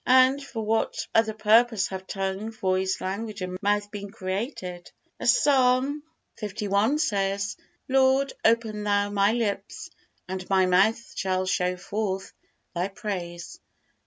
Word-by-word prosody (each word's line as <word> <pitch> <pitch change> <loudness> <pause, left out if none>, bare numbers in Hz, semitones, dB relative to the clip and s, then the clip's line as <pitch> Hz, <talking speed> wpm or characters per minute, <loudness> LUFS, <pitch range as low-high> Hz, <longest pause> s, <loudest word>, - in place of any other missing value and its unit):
And 260 +2 +5
for 225 -6 -5
what 220 +1 0
other 220 -1 +3
purpose 225 0 +4
have 190 0 -7
tongue, 195 +2 -3
voice, 190 -3 -1
language 205 +2 -4
and 185 0 -4
mouth 205 0 0
been 200 -1 -6
created? 185 -3 -5 0.3
As - - +4
Psalm 270 - +3 0.4
li. 210 +5 0
says: 200 -7 0 0.3
"Lord, 265 +1 +3
open 225 -2 +2
Thou 205 0 +1
my 200 0 +3
lips, 225 -4 -3 0.4
and 185 0 -5
my 190 -1 +4
mouth 190 +6 +4 0.2
shall 185 -1 0
show 180 -1 0
forth 195 0 -3 0.4
Thy 180 +1 -1
praise." 180 -4 -6
205 Hz, 130 wpm, -26 LUFS, 190-225 Hz, 0.4 s, And